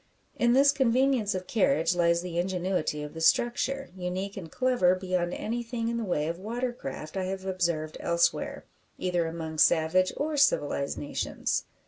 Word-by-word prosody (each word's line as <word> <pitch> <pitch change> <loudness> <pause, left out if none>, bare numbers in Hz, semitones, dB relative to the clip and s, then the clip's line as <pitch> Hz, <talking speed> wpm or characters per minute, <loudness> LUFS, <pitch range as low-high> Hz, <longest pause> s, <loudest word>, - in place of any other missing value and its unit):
In 240 0 +3
this 280 +2 +6
convenience 255 -5 +2
of 185 0 -4
carriage 165 -5 +2
lies 170 0 +2
the 175 -1 -3
ingenuity 180 -4 -1
of 150 - -7
the 160 - -7
structure 255 +9 +1
unique 185 +2 -4
and 165 -5 -8
clever 250 -9 +3
beyond 185 -2 -1
anything 230 0 -3
in 235 - -2
the 230 - -2
way 175 -7 0
of 170 +1 -3
water 240 +5 -3
craft 155 - -7
I 190 -1 -1
have 190 0 -4
observed 170 -5 -1
elsewhere, 170 0 0 0.3
either 175 -2 0
among 160 -1 -5
savage 170 +4 +4
or 300 +1 -1
civilised 145 - +2
nations. 145 - -2
185 Hz, 160 wpm, -28 LUFS, 170-235 Hz, 0.3 s, this